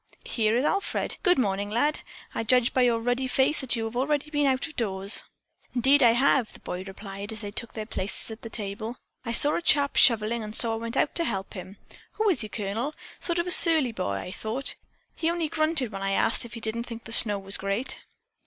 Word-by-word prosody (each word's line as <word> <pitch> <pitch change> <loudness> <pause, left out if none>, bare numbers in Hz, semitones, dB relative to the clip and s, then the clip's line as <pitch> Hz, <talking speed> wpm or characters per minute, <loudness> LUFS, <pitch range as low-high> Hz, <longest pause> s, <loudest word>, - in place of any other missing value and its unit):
Here 220 -1 0
is 250 +4 0
Alfred. 395 +5 -1
Good 360 -2 +3
morning, 200 -4 -1
lad, 290 +8 0 0.3
I - - -3
judge 245 +1 +2
by 260 - +2
your 240 -2 +2
ruddy 245 +3 -1
face 270 +4 +1
that 265 -1 0
you 225 -1 -3
have 225 +1 -7
already 290 +3 -1
been 290 -2 +1
out 265 +2 0
of 310 -2 -10
doors." 195 -2 +2 0.5
"Indeed 270 +4 +4
I 235 -2 +5
have," 255 -1 +1
the - - -14
boy 180 +1 -6
replied 200 +1 -8
as 220 0 -7
they 205 -1 -6
took 230 +3 -6
their 215 -1 -6
places 210 +1 -1
at 220 - -10
the 230 - -8
table. 220 +2 -5 0.3
"I 230 - -4
saw 290 +5 +5
a - - -3
chap 285 -4 +2
shoveling 230 -1 +4
and 215 0 -7
so 230 -2 0
I - - -3
went 230 +2 -6
out - - +1
to 340 - +3
help 195 - -4
him. 190 0 -10 0.4
Who 435 - -1
is 330 -11 0
he, 215 - -6
Colonel? 220 +8 -4 0.2
Sort 340 -1 0
of 345 - 0
a 360 - -2
surly 320 -8 +7
boy, 100 - -4
I 100 - -6
thought. 220 +7 -3 0.4
He 325 - -1
only 340 -1 -1
grunted 310 -6 -1
when 195 -1 -7
I 195 0 -1
asked 225 +4 0
if 235 - -11
he 230 - -8
didn't 225 +2 -1
think 230 -1 -9
the 225 - -11
snow 210 -3 +8
was 195 0 -6
great." 200 +6 -4
235 Hz, 235 wpm, -25 LUFS, 210-275 Hz, 0.5 s, snow